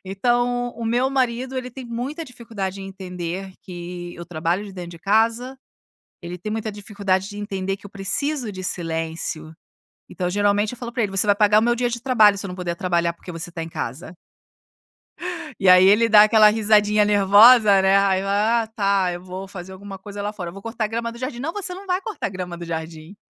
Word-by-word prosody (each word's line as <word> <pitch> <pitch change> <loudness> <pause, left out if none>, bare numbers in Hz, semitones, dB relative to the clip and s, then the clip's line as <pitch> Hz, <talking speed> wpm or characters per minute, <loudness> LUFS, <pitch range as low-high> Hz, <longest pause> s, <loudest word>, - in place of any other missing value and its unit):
Então, 245 +5 0
o 235 - -6
meu 245 +3 +1
marido 255 -1 -1
ele 250 0 -6
tem 260 +1 -9
muita 250 +7 -5
dificuldade 220 -7 -6
em 195 - -7
entender, 185 0 -6
que 175 -1 -8
eu 170 - -8
trabalho 170 +3 -2
de 200 - -10
dentro 180 -2 -8
de 170 - -12
casa, 225 +7 +1 0.6
ele 175 0 -7
tem 185 +4 -6
muita 220 0 -3
dificuldade 200 -2 -2
de 205 - -9
entender, 195 -2 -3
que 200 - -13
eu - - -15
preciso 245 +6 -2
de 185 -2 -7
silêncio. 160 -2 -4 0.5
Então, 180 -1 -3
geralmente 205 +2 +1
eu 250 - -9
falo 240 -1 -6
para 235 - -1
ele, 205 - -1
"Você 195 +2 +2
vai 205 -1 +4
pagar 210 0 +5
o - - -1
meu 240 +1 +2
dia 245 0 -1
de 235 0 -4
trabalho, 220 -5 +4
se 200 - -5
eu - - -7
não 180 - -6
puder 175 -2 -3
trabalhar, 170 -2 0
porque 170 +2 -12
você 170 +1 -6
está 165 -1 -6
em 165 - -6
casa". 160 +3 -6 1.5
E 190 - +4
aí 185 0 +8
ele 220 +4 +5
dá 210 -1 +8
aquela 215 0 +6
risadinha 210 -1 +3
nervosa, 205 +1 +6
né, 190 +1 +4
ai 195 -1 +2
eu, 195 - -5
"Ah 220 +3 +1
tá, 195 -3 +1
eu 175 - -7
vou 185 +1 -7
fazer 190 -1 -9
alguma 195 +1 -9
coisa 200 +1 -8
lá 205 +1 -3
fora, 175 -5 -6
vou 195 +3 -11
cortar 225 0 -3
grama 230 +1 -3
do 235 - -11
jardim", 250 -1 -5
"Não 310 +6 -3
você 395 -3 -4
não 385 +2 -10
vai 370 0 -1
cortar 430 +2 -4
a - - -6
grama 180 -2 -6
do 170 - -7
jardim, 160 +2 -6
200 Hz, 220 wpm, -22 LUFS, 185-230 Hz, 1.5 s, aí